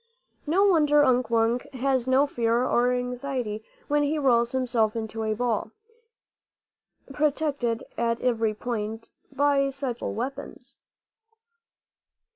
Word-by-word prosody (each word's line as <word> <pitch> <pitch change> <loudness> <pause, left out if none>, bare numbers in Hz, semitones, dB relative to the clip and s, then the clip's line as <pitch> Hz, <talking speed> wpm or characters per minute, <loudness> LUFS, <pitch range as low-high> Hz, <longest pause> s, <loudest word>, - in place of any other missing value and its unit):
No 375 +6 +3
wonder 300 -6 +4
Unk 250 -2 +2
Wunk 235 +4 +1
has 260 -1 0
no 260 +2 +4
fear 235 -3 0
or 245 0 +2
anxiety 250 -3 -3 0.2
when 295 0 +2
he 290 +2 0
rolls 240 -4 +2
himself 240 -4 0
into 225 0 -4
a 215 -1 -1
ball, 235 -1 -1 1.4
protected 285 -5 0 0.2
at 230 0 0
every 225 -3 0
point 225 -1 -5 0.2
by 280 -1 +2
such 270 -3 -4
terrible - - -4
weapons. 255 +5 -7
250 Hz, 115 wpm, -26 LUFS, 230-275 Hz, 1.4 s, wonder